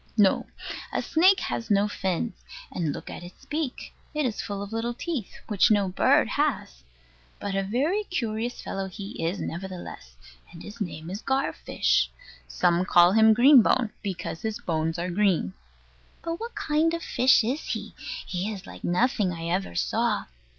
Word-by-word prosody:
No: 200 -3 +4 0.4
a - - -1
snake 375 +4 +4
has 230 - -3
no 205 0 +4
fins; 190 +2 -2 0.4
and 165 -4 -1
look - - -7
at - - -7
its 175 +1 -13
beak: 295 -3 -4 0.2
it 300 -1 +1
is 230 -5 -1
full 200 -1 -4
of 200 +2 -8
little 235 +1 -2
teeth, 275 - -4
which 210 -4 +4
no 205 -3 +3
bird 180 - +3
has. 60 0 -1 0.6
But 200 -1 -3
a 195 - +1
very 285 - 0
curious 235 - -3
fellow 195 0 -3
he 195 -1 -7
is, 170 +4 -1
nevertheless: 175 - -7 0.4
and 165 - -11
his 210 +2 -10
name 160 -2 -5
is 200 +3 -5
Gar 270 +1 0
fish. - - +1 0.4
Some 175 0 +2
call 175 -1 +6
him 220 +2 +6
Green 260 +2 +8
bone, 230 0 +2
because 180 -5 -4
his 220 -1 -2
bones 160 0 -1
are 175 +1 -2
green. 180 - +1 0.7
But 335 +1 -3
what 465 +1 -6
kind 320 +2 +1
of 335 - -5
fish 250 -1 +4
is 255 +7 -1
he? - - -4 0.3
He 190 +3 -2
is 195 -2 -7
like - - -11
nothing 205 +1 +2
I 165 -1 -4
ever 180 - -1
saw. - - 0
205 Hz, 170 wpm, -26 LUFS, 180-245 Hz, 0.7 s, Green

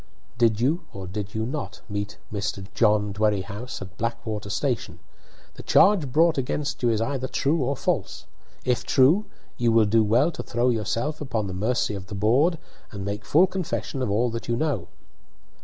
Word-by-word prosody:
"Did 115 -3 +3
you, 155 +9 +1
or 95 -1 -6
did 100 +2 -5
you 110 0 -1
not, 140 +5 -5
meet 100 -1 -4 0.2
Mr. 100 -1 -3
John 105 -2 +2
Dwerrihouse 105 +2 -2
at 95 +2 -13
Blackwater 115 -3 -3
station? 110 - -2 0.6
The - - -10
charge 180 -10 +4
brought 160 +1 +4
against 140 +3 -2
you 120 - +3
is 110 -2 +1
either 130 +2 -1
true 150 +5 +1
or 135 +2 -1
false. - - -2 0.4
If 125 -1 +1
true, 150 +11 +4 0.3
you 120 -1 +2
will 115 -1 +5
do 110 +2 +4
well 120 +10 +3
to - - -6
throw 120 +1 0
yourself 115 +7 -2
upon 115 -7 -2
the 95 - -5
mercy 105 +3 0
of 95 -1 -7
the 105 - -6
board 130 - +3 0.3
and 100 -2 -6
make 100 +1 -3
full 165 - +5
confession 180 -7 -3
of 125 - 0
all 115 +4 +1
that 115 0 -5
you 120 - +1
know." 120 - -1
115 Hz, 180 wpm, -25 LUFS, 105-135 Hz, 0.6 s, will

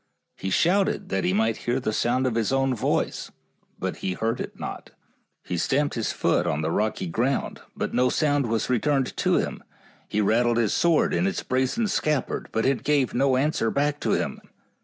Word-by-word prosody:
He 95 - -4
shouted 185 - +2
that 95 0 -1
he - - +2
might 110 +3 +1
hear 120 +2 -1
the 110 -4 -2
sound 125 +4 +1
of 125 - +1
his 115 0 0
own 135 -1 +2
voice, 115 - -1 0.5
but - - -3
he 95 - -2
heard 115 +5 -2
it - - -7
not. - - -6 0.5
He 90 - -3
stamped 145 - +1
his 115 -2 -1
foot - - +1
on 75 +2 -1
the 80 - 0
rocky 105 0 -1
ground, 120 +11 -1
but - - -3
no 125 0 +3
sound 145 -1 +1
was 115 0 0
returned 130 +2 +1
to - - +2
him. - - -2 0.4
He 105 - -1
rattled 115 +3 +2
his 115 -4 +2
sword 170 -2 +3
in 190 - +2
its 195 - -2
brazen 130 - 0
scabbard, 150 -8 -1
but 110 - 0
it 135 0 +1
gave 145 -4 +1
no 130 0 +2
answer 135 -4 +1
back 145 +3 0
to - - 0
him. - - -2
125 Hz, 195 wpm, -25 LUFS, 110-140 Hz, 0.5 s, no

